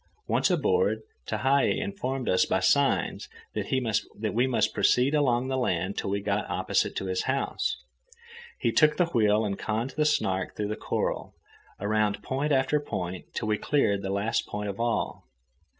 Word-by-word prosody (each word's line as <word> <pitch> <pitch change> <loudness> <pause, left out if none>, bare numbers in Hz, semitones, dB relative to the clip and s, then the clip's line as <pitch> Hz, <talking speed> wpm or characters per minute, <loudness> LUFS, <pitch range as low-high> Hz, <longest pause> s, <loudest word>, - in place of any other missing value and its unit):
Once - - +2
aboard, 460 +1 +1 0.2
Tehei 135 +6 +2
informed 135 -11 -3
us 90 - +4
by - - +1
signs - - +2 0.2
that 110 -3 -1
we 120 +4 +2
must 125 - +1
proceed 125 +4 +3
along 130 -4 +2
the 130 0 -1
land 95 -4 -1
till - - -2
we 100 +1 0
got 100 +1 -1
opposite - - 0
to - - -3
his 95 -1 -1
house. 135 +1 -1 0.8
He - - 0
took 150 -1 +4
the 180 - +4
wheel 110 -8 +2
and 100 -1 -3
conned 115 +4 -2
the 150 +3 0
Snark 95 -11 0
through 105 -1 -2
the 105 - -2
coral, - - -3 0.4
around 105 0 0
point 140 +3 -1
after 135 +2 +2
point 90 -10 -5
till - - -2
we 105 -1 +1
cleared 100 -9 +1
the 95 - -4
last 100 +4 0
point 105 0 -4
of 100 - -6
all. 115 - -1
115 Hz, 165 wpm, -27 LUFS, 100-135 Hz, 0.8 s, us